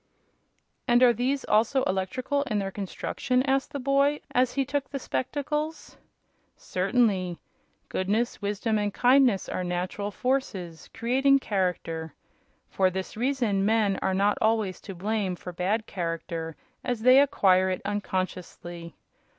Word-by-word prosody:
"And 240 Hz, 0 st, +5 dB
are 245 Hz, -1 st, +7 dB
these, 265 Hz, +4 st, -1 dB
also, 230 Hz, +5 st, +2 dB
electrical 250 Hz, +10 st, -1 dB
in 225 Hz, -6 st, -1 dB
their 195 Hz, -1 st, -2 dB
construction?" 250 Hz, +6 st, -1 dB
asked 270 Hz, +1 st, 0 dB
the 285 Hz, -, -4 dB
boy, 275 Hz, +2 st, +2 dB
as 250 Hz, 0 st, +2 dB
he 275 Hz, 0 st, 0 dB
took 280 Hz, +1 st, -2 dB
the 275 Hz, -, -4 dB
spectacles. 300 Hz, +4 st, -3 dB, 0.6 s
"Certainly. 185 Hz, -3 st, 0 dB, 0.5 s
Goodness, 215 Hz, +6 st, -1 dB
wisdom 210 Hz, +2 st, 0 dB
and 205 Hz, 0 st, 0 dB
kindness 250 Hz, -4 st, +4 dB
are 185 Hz, -, -3 dB
natural 180 Hz, +3 st, -3 dB
forces, 200 Hz, -, -3 dB
creating 270 Hz, +4 st, +3 dB
character. 180 Hz, -, -2 dB, 0.5 s
For 190 Hz, -1 st, +2 dB
this 190 Hz, +1 st, -5 dB
reason 235 Hz, -5 st, 0 dB
men 210 Hz, -2 st, +2 dB
are 190 Hz, -, 0 dB
not 200 Hz, +2 st, +2 dB
always 220 Hz, -4 st, +1 dB
to 195 Hz, -, -5 dB
blame 200 Hz, 0 st, -1 dB
for 180 Hz, 0 st, -8 dB
bad 200 Hz, +6 st, -1 dB
character, 165 Hz, -3 st, -4 dB, 0.3 s
as 245 Hz, -3 st, -2 dB
they 255 Hz, +2 st, +8 dB
acquire 190 Hz, -10 st, +3 dB
it 185 Hz, -, -3 dB
unconsciously. 185 Hz, -4 st, -4 dB
210 Hz, 135 wpm, -27 LUFS, 185-255 Hz, 0.6 s, they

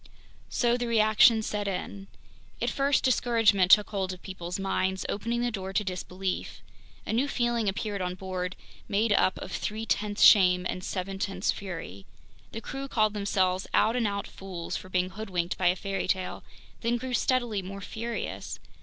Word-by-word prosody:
So 240 Hz, 0 st, +2 dB
the 245 Hz, -1 st, -2 dB
reaction 220 Hz, 0 st, +5 dB
set 210 Hz, -1 st, -2 dB
in. 195 Hz, +1 st, -4 dB, 0.5 s
At -, -, 0 dB
first, 275 Hz, 0 st, +2 dB
discouragement 225 Hz, -7 st, +3 dB
took 210 Hz, +1 st, +6 dB
hold 190 Hz, -2 st, -1 dB
of 185 Hz, -1 st, -9 dB
people's 180 Hz, -2 st, -5 dB
minds, 190 Hz, -1 st, -1 dB
opening 230 Hz, +4 st, -2 dB
the 240 Hz, 0 st, 0 dB
door 190 Hz, -3 st, -5 dB
to 210 Hz, -, +1 dB
disbelief. 185 Hz, 0 st, -4 dB, 0.4 s
A -, -, -2 dB
new 250 Hz, +5 st, +2 dB
feeling 240 Hz, -5 st, 0 dB
appeared 200 Hz, 0 st, -3 dB
on 180 Hz, 0 st, -2 dB
board, 185 Hz, -1 st, -4 dB, 0.3 s
made 215 Hz, +1 st, +2 dB
up 185 Hz, -, +3 dB
of -, -, -7 dB
three 215 Hz, +1 st, -3 dB
tenths 210 Hz, -1 st, 0 dB
shame 180 Hz, -3 st, +7 dB
and 180 Hz, -, -4 dB
seven 190 Hz, +1 st, -4 dB
tenths 195 Hz, -1 st, 0 dB
fury. 165 Hz, -, -7 dB, 0.4 s
The 225 Hz, -, -6 dB
crew 270 Hz, +5 st, -5 dB
called 215 Hz, -5 st, +2 dB
themselves 190 Hz, -2 st, 0 dB
"out 225 Hz, -, +4 dB
and 235 Hz, -3 st, +1 dB
out 200 Hz, 0 st, -2 dB
fools" 185 Hz, -3 st, -6 dB
for 185 Hz, -, -6 dB
being 185 Hz, 0 st, 0 dB
hoodwinked 185 Hz, -4 st, -2 dB
by 185 Hz, -, +3 dB
a 175 Hz, -, +4 dB
fairy 195 Hz, 0 st, -3 dB
tale, 185 Hz, -1 st, -2 dB, 0.4 s
then 235 Hz, +1 st, 0 dB
grew 255 Hz, +1 st, -5 dB
steadily 240 Hz, -5 st, +1 dB
more 195 Hz, +2 st, -7 dB
furious! 230 Hz, +3 st, -5 dB
200 Hz, 170 wpm, -28 LUFS, 185-225 Hz, 0.5 s, shame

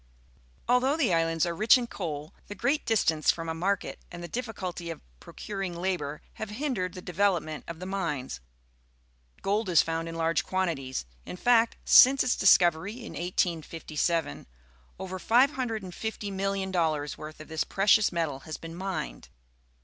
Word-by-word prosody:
Although 255 Hz, +4 st, +3 dB
the 250 Hz, -, +2 dB
islands 165 Hz, 0 st, +2 dB
are 170 Hz, -, -2 dB
rich 215 Hz, +8 st, +5 dB
in 245 Hz, -, -2 dB
coal, 155 Hz, -8 st, -5 dB
the 205 Hz, -, -7 dB
great 280 Hz, +8 st, 0 dB
distance 160 Hz, -9 st, +2 dB
from 165 Hz, -1 st, +1 dB
a 160 Hz, -, -1 dB
market 190 Hz, +5 st, -2 dB
and 175 Hz, -1 st, -8 dB
the -, -, -5 dB
difficul 210 Hz, -3 st, -4 dB
ty 175 Hz, -, -8 dB
of 165 Hz, -1 st, -5 dB, 0.2 s
procuring 195 Hz, -, -6 dB
labour 170 Hz, -5 st, -2 dB, 0.2 s
have 220 Hz, -, -3 dB
hindered 210 Hz, -, -2 dB
the 180 Hz, -, -8 dB
development 175 Hz, -5 st, 0 dB
of 170 Hz, -1 st, -7 dB
the 185 Hz, -, -6 dB
mines. 165 Hz, -, -3 dB, 1.0 s
Gold 205 Hz, +1 st, 0 dB
is 170 Hz, -3 st, +5 dB
found 165 Hz, 0 st, -3 dB
in 165 Hz, -, -6 dB
large 165 Hz, 0 st, +1 dB
quantities; 160 Hz, -, -2 dB, 0.2 s
in -, -, -8 dB
fact, 235 Hz, +1 st, +3 dB
since 270 Hz, +2 st, +8 dB
its 255 Hz, -, +1 dB
discovery 175 Hz, 0 st, +4 dB
in 240 Hz, -1 st, -9 dB
1857, 165 Hz, -3 st, -1 dB, 0.5 s
over 185 Hz, 0 st, -6 dB
$550,000,000 195 Hz, -, 0 dB
worth 155 Hz, 0 st, -9 dB
of 155 Hz, -, -10 dB
this 160 Hz, 0 st, -1 dB
precious 205 Hz, +2 st, +3 dB
metal 160 Hz, -6 st, -2 dB
has 155 Hz, +3 st, -7 dB
been 165 Hz, 0 st, -9 dB
mined. 185 Hz, -, -5 dB
180 Hz, 150 wpm, -28 LUFS, 165-205 Hz, 1.0 s, since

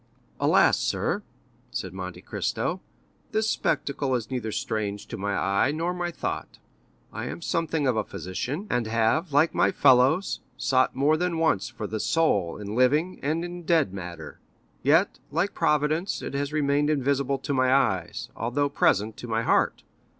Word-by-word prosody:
"Alas, -, -, +4 dB
sir," -, -, -1 dB, 0.5 s
said -, -, -5 dB
Monte -, -, -7 dB
Cristo -, -, -2 dB, 0.5 s
"this 220 Hz, 0 st, +1 dB
spectacle 140 Hz, -8 st, 0 dB
is 115 Hz, -1 st, -4 dB
neither 120 Hz, -4 st, -2 dB
strange 105 Hz, -2 st, -3 dB
to -, -, -7 dB
my 100 Hz, +1 st, -2 dB
eye 100 Hz, +7 st, +2 dB
nor 165 Hz, +4 st, -1 dB
my 175 Hz, -1 st, -2 dB
thought. 170 Hz, -, -5 dB, 0.6 s
I -, -, -4 dB
am -, -, -5 dB
something 160 Hz, -3 st, 0 dB
of 130 Hz, -3 st, +2 dB
a 110 Hz, -, +1 dB
physician, 125 Hz, -, -4 dB
and 120 Hz, -, 0 dB
have, 115 Hz, +9 st, +1 dB
like 145 Hz, +4 st, +3 dB
my -, -, +3 dB
fellows, 130 Hz, +9 st, +4 dB, 0.2 s
sought 130 Hz, -1 st, +2 dB
more 145 Hz, +4 st, +3 dB
than 175 Hz, 0 st, -1 dB
once 160 Hz, -4 st, +1 dB
for 115 Hz, -4 st, -6 dB
the 110 Hz, +1 st, -3 dB
soul 160 Hz, -, +1 dB
in 105 Hz, 0 st, -6 dB
living 150 Hz, +9 st, +2 dB
and 160 Hz, +4 st, -1 dB
in 175 Hz, 0 st, -7 dB
dead 160 Hz, -, +2 dB
matter; 85 Hz, -5 st, -8 dB, 0.4 s
yet, 160 Hz, +8 st, +3 dB
like 170 Hz, +7 st, 0 dB
Providence, 155 Hz, +3 st, +1 dB
it -, -, -5 dB
has 140 Hz, +1 st, -2 dB
remained 145 Hz, -1 st, +1 dB
invisible 140 Hz, -1 st, +1 dB
to 135 Hz, +1 st, -3 dB
my 130 Hz, -1 st, +3 dB
eyes, 115 Hz, -3 st, +1 dB
although 140 Hz, +5 st, 0 dB
present 110 Hz, -5 st, +1 dB
to 120 Hz, -, -8 dB
my 115 Hz, 0 st, 0 dB
heart. -, -, +2 dB
140 Hz, 165 wpm, -26 LUFS, 110-160 Hz, 0.6 s, Alas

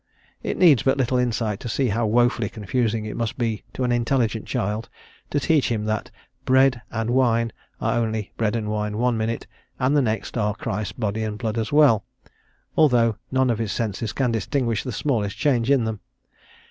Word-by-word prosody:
It -, -, -3 dB
needs 155 Hz, -10 st, +6 dB
but 135 Hz, +1 st, +2 dB
little 130 Hz, -1 st, +1 dB
insight 115 Hz, -4 st, -1 dB
to 120 Hz, -, -6 dB
see 130 Hz, +2 st, +1 dB
how 110 Hz, +2 st, 0 dB
woefully 120 Hz, -1 st, +2 dB
confusing 110 Hz, +1 st, -1 dB
it 110 Hz, -, -5 dB
must 115 Hz, -1 st, -2 dB
be 115 Hz, -4 st, -1 dB
to 130 Hz, -, -3 dB
an 125 Hz, -, +1 dB
intelligent 120 Hz, -2 st, 0 dB
child 105 Hz, +4 st, -2 dB, 0.4 s
to 145 Hz, -, 0 dB
teach 150 Hz, 0 st, +2 dB
him 110 Hz, -3 st, -1 dB
that 110 Hz, -1 st, -2 dB, 0.3 s
bread 130 Hz, -1 st, +4 dB
and 115 Hz, +1 st, -2 dB
wine 115 Hz, -3 st, +2 dB, 0.3 s
are 120 Hz, -, +1 dB
only 110 Hz, -3 st, -2 dB
bread 110 Hz, -1 st, 0 dB
and 110 Hz, -2 st, -2 dB
wine 105 Hz, 0 st, -2 dB
one 120 Hz, +1 st, +2 dB
minute 110 Hz, +1 st, -2 dB, 0.3 s
and 130 Hz, +3 st, +1 dB
the 145 Hz, -, +5 dB
next 110 Hz, 0 st, -2 dB
are 105 Hz, -1 st, 0 dB
Christ's 105 Hz, -1 st, -3 dB
body 110 Hz, 0 st, -2 dB
and 105 Hz, -1 st, -3 dB
blood 115 Hz, 0 st, -2 dB
as 110 Hz, -, -3 dB
well, 145 Hz, -8 st, +5 dB, 0.7 s
although 120 Hz, -7 st, +4 dB, 0.2 s
none 130 Hz, -1 st, +2 dB
of 115 Hz, -, -1 dB
his 110 Hz, -3 st, -2 dB
senses 110 Hz, -1 st, -2 dB
can 125 Hz, +1 st, 0 dB
distinguish 115 Hz, +1 st, 0 dB
the 130 Hz, -, -4 dB
smallest 105 Hz, -4 st, -1 dB
change 125 Hz, -4 st, +1 dB
in 140 Hz, -4 st, +4 dB
them. 110 Hz, -2 st, -3 dB
115 Hz, 190 wpm, -23 LUFS, 110-125 Hz, 0.7 s, needs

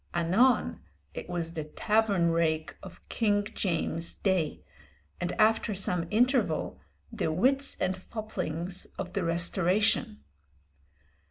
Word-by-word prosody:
Anon 190 Hz, +10 st, +3 dB, 0.3 s
it -, -, -7 dB
was 170 Hz, -2 st, -3 dB
the 160 Hz, -2 st, -3 dB
tavern 200 Hz, +2 st, +1 dB
rake 160 Hz, -1 st, 0 dB
of 185 Hz, -, -13 dB
King 205 Hz, -3 st, +1 dB
James' 170 Hz, -2 st, -1 dB
day, 185 Hz, -6 st, -1 dB, 0.6 s
and 175 Hz, 0 st, -2 dB
after 220 Hz, -1 st, +2 dB
some 180 Hz, -3 st, 0 dB
interval, 250 Hz, +4 st, +1 dB, 0.3 s
the 205 Hz, -8 st, -1 dB
wits 270 Hz, -, +1 dB
and 185 Hz, 0 st, 0 dB
foplings 185 Hz, -4 st, -4 dB
of 185 Hz, -2 st, -5 dB
the 195 Hz, -, -1 dB
Restoration. 185 Hz, +6 st, +1 dB
185 Hz, 110 wpm, -29 LUFS, 170-215 Hz, 0.6 s, Anon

